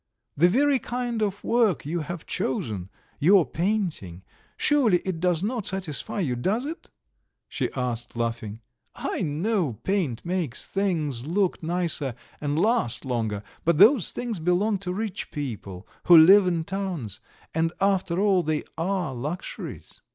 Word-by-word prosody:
The 175 +5 +5
very 275 +6 +3
kind 240 -2 -3
of 200 -1 -1
work 225 - +2
you 170 +4 -2
have 170 +1 -6
chosen 105 -8 -2 0.3
your 180 +3 +5
painting 165 - -2 0.3
surely 260 -11 +4
it 185 -4 -2
does 175 0 +1
not 225 -1 -2
satisfy 190 0 -2
you, 130 -8 0
does 200 - -1
it?" 320 +3 -7 0.6
she - - -2
asked, 120 -2 -3
laughing. 115 -2 -3 0.3
"I - - -3
know 170 - 0
paint 165 - -2
makes 175 -8 -2
things 155 -10 -1
look 190 +2 0
nicer 165 -6 0 0.3
and 145 0 -1
last 190 - +1
longer, 110 -5 -2 0.2
but 170 -1 +2
those 215 - +6
things 235 -6 -4
belong 185 +5 +1
to 180 -2 -4
rich 210 +1 -4
people 105 -9 -6 0.2
who 175 -2 +9
live 185 +4 +8
in 170 -2 0
towns, 175 - -4 0.3
and 165 +1 +1
after 190 -3 +1
all 195 -2 +3
they 155 -2 -1 0.2
are 180 -4 -1
luxuries. 150 +9 -6
175 Hz, 145 wpm, -25 LUFS, 140-200 Hz, 0.6 s, who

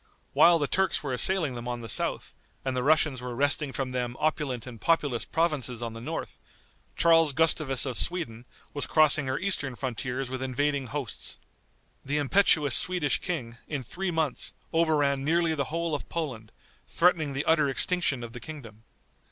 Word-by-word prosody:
While 170 0 +6
the 150 - 0
Turks 190 +4 0
were 135 -3 -2
assailing 160 +1 +2
them 120 0 -7
on 120 -1 -3
the 115 - -7
south, - - -2 0.3
and 130 -1 -1
the 125 - 0
Russians 150 -2 +2
were 125 -1 -5
wresting 145 +2 +1
from 130 -1 -3
them 120 -1 -3
opulent 145 -6 -1
and 120 -4 -10
populous 145 -8 +1
provinces 145 -8 -1
on 115 -1 -4
the 115 - -8
north, - - -5 0.6
Charles 165 -3 +4
Gustavus 155 -4 +1
of 130 -3 -3
Sweden, 125 -10 -2 0.3
was 145 - -4
crossing 155 -2 +4
her 130 +1 -1
eastern 170 -9 -1
frontiers 130 +1 -3
with 130 +1 -5
invading 135 +1 -1
hosts. 135 -3 -6 0.7
The 145 +2 -1
impetuous 150 -2 +3
Swedish 175 -4 +1
king, 125 -10 -4
in 145 -4 -4
three 185 - -4
months, 160 -5 -1 0.2
overran 150 -4 +2
nearly 165 +2 +2
the 140 -3 -1
whole 165 +2 -2
of 145 - -4
Poland, 130 -10 -4 0.4
threatening 165 -5 +2
the 140 +2 -2
utter 155 -3 +3
extinction 140 -3 +2
of 115 -1 -8
the 120 - -7
kingdom. 115 -7 -10
140 Hz, 170 wpm, -27 LUFS, 125-160 Hz, 0.7 s, While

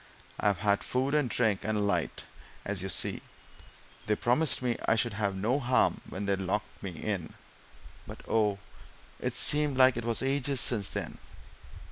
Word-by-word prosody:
I've 100 -2 +1
had 100 +2 0
food 130 +3 -1
and 150 -4 +1
drink 110 -4 +1
and 110 0 -2
a - - 0
light, 90 -6 -2 0.4
as 100 -2 -3
you 95 - -4
see - - 0 0.9
they 105 - +2
promised 125 +5 +1
me 120 -2 0
I - - +4
should 115 0 -1
have 100 -2 -2
no 115 +8 0
harm 130 -1 +1
when 100 +2 -5
they 100 0 +1
locked 95 +2 -4
me 100 - -5
in. 90 -1 -5 0.7
But - - -10
oh, 105 -3 +1 0.6
it's - - -3
seemed 150 -2 +5
like 130 -2 +5
it 120 - -3
was 115 +2 -1
ages 135 0 +2
since 110 -6 +5
then!" - - -5
110 Hz, 170 wpm, -29 LUFS, 100-125 Hz, 0.9 s, seemed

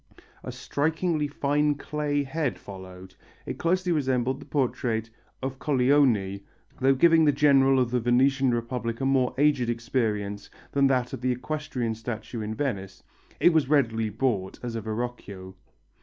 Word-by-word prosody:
A - - -5
strikingly 160 +1 -1
fine 145 +1 +1
clay 145 0 -2
head 140 -1 -2
followed. 95 -1 -11 0.3
It - - -6
closely 180 +1 +1
resembled 130 -4 0
the - - -12
portrait 120 -5 -1 0.3
of 135 0 -4
Colleoni, 125 -8 +2 0.4
though 135 +1 +4
giving 165 +3 +5
the 145 - +5
general 135 -2 +4
of 125 -2 +1
the 125 - +1
Venetian 130 +2 +3
Republic 115 -1 -3
a 135 - -1
more 135 -2 +2
aged 140 -4 +2
appearance 110 -4 -2 0.2
than 140 -1 +3
that 125 -2 0
of - - -5
the 130 0 +1
equestrian 125 -3 -3
statue 110 +1 -6
in 110 +1 -4
Venice: 100 -8 -4 0.4
it 175 - +5
was 155 -4 +2
readily 115 -7 +2
bought 105 -4 -1
as 120 -2 -4
a 115 - -3
Verrocchio. 110 -4 -5
130 Hz, 150 wpm, -26 LUFS, 115-145 Hz, 0.4 s, giving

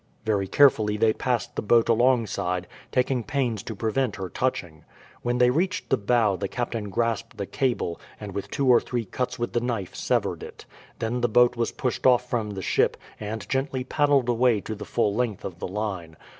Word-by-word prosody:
Very 100 -3 +1
carefully 110 -4 +4
they 110 0 +3
passed 125 -1 -2
the - - -1
boat 115 +2 +4
alongside, 115 -7 +1 0.3
taking 125 -1 +1
pains 120 -5 -1
to 110 0 -6
prevent 115 +2 0
her 95 -2 -5
touching. 85 -12 -2 0.4
When 120 0 0
they 125 0 +5
reached 185 +8 -1
the 135 - +4
bow 110 -1 +2
the 100 - -2
captain 115 -2 -3
grasped 115 +2 -1
the 100 - -3
cable, 120 - -1 0.2
and 105 -2 -7
with 100 - -4
two 140 -2 -1
or 125 -2 +6
three 120 -2 -3
cuts 125 +6 -3
with 120 -1 -3
the 120 - +1
knife 115 -6 -3
severed - - -1
it. - - -10 0.3
Then 120 +2 -2
the 120 - +2
boat 120 +2 +5
was 120 -1 -1
pushed 125 0 -1
off 125 -1 +4
from 115 -4 -1
the 95 -2 -5
ship - - +2 0.2
and 105 0 -5
gently 135 -1 -1
paddled 140 -1 +2
away 120 -2 +3
to 110 - -5
the 105 - -7
full 105 -4 +1
length 115 -3 -2
of 90 -3 -6
the - - -3
line. 95 -5 -4
115 Hz, 200 wpm, -25 LUFS, 105-125 Hz, 0.4 s, or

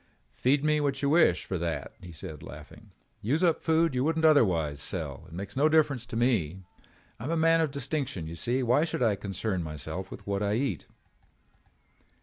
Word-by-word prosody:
"Feed 135 +3 +1
me 150 0 +3
what 140 -1 -1
you 140 - +2
wish 150 - +4
for 95 - -3
that," 85 -1 -3
he 90 -2 -10
said 80 -1 -8
laughing. - - -12 0.3
"Use 145 - 0
up 165 -3 +3
food 165 0 +3
that - - -7
you 125 - +2
wouldn't 160 +2 +1
otherwise 85 - +3
sell. - - -4
It - - -17
makes 95 +4 -6
no 145 +3 +4
difference 145 -6 +2
to - - -7
me. 100 - +1 0.6
I 115 - -6
am - - -3
a 165 - 0
man 165 +1 +4
of 160 - +1
distinction, 140 - -3
you 80 - -6
see. 120 +9 -1
Why 125 +5 +3
should 160 -6 -1
I 110 -3 +3
concern 100 -1 -3
myself 75 -4 -6
with - - -10
what 100 0 -2
I 105 0 +1
eat." 115 - -2
125 Hz, 200 wpm, -28 LUFS, 95-150 Hz, 0.6 s, wish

